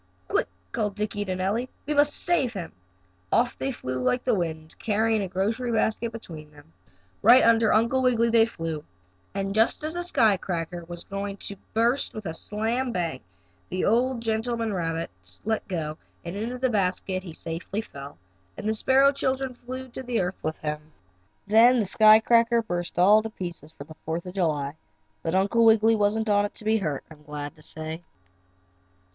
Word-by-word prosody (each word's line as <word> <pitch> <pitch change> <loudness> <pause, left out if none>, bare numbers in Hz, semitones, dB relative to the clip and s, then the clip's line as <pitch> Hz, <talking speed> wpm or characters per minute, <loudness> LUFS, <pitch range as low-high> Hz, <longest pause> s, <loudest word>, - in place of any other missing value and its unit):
"Quick," - - +1 0.2
called 205 - -1
Dickie 205 0 -2
to 185 -1 -2
Nellie. 205 +7 -1 0.2
"We 300 - -1
must 290 0 +3
save 275 -9 +1
him." 180 -5 -6 0.6
Off 240 +1 +2
they 270 - -1
flew 130 - -4
like 250 - +1
the 250 - +2
wind, 160 -4 -3
carrying 220 0 +1
a 195 - -2
grocery 215 +7 -1
basket 220 +1 0
between 165 -9 -9
them. 145 - -19 0.5
Right 240 +5 +8
under 225 -1 +5
Uncle 235 +4 +3
Wiggily 235 -2 +3
they 225 -1 +5
flew, 165 -8 -5 0.5
and 195 0 -2
just 225 +7 +2
as 310 +1 -2
the 350 - -2
sky 225 - +3
cracker 175 -1 -4
was 175 0 -8
going 200 0 -5
to 200 - -7 0.2
burst 235 +5 +1
with 215 -1 -6
a 160 - -3
"slam 225 +8 -2
bang!" 170 - -2 0.5
the 185 - -1
old 245 +2 +2
gentleman 225 0 -1
rabbit 165 - -2 0.3
let 220 0 -1
go, 155 -4 -3 0.3
and 170 +2 -5
into 230 +5 -3
the 255 0 0
basket 185 -2 0
he 180 -3 -9
safely 165 +6 -4
fell 140 - -10 0.4
and 215 - -4
the 220 - +2
sparrow 265 +5 +4
children 265 -1 -1
flew 255 +2 -7
to 245 -1 -3
earth 180 +1 -2
with 155 0 -3
him. 150 0 -5 0.5
Then 230 +5 +6
the 215 - +1
sky 215 +3 +7
cracker 230 +1 +3
burst 175 -4 -4
all 205 +5 +6
to 220 - -5
pieces 175 -7 -7
for 140 - -11 0.2
Fourth 165 +2 -3
of 180 - -7
July, 155 -6 -1 0.4
but 165 +2 -1
Uncle 200 +5 +3
Wiggily 225 0 +5
wasn't 215 +1 +1
on 205 -1 +3
it 205 - -6
to 215 - -9
be 220 +1 +3
hurt, 150 -8 -2
I'm 150 -1 -14
glad 150 0 -7
to 155 - -19
say. 160 +2 -6
210 Hz, 180 wpm, -26 LUFS, 170-230 Hz, 0.6 s, Right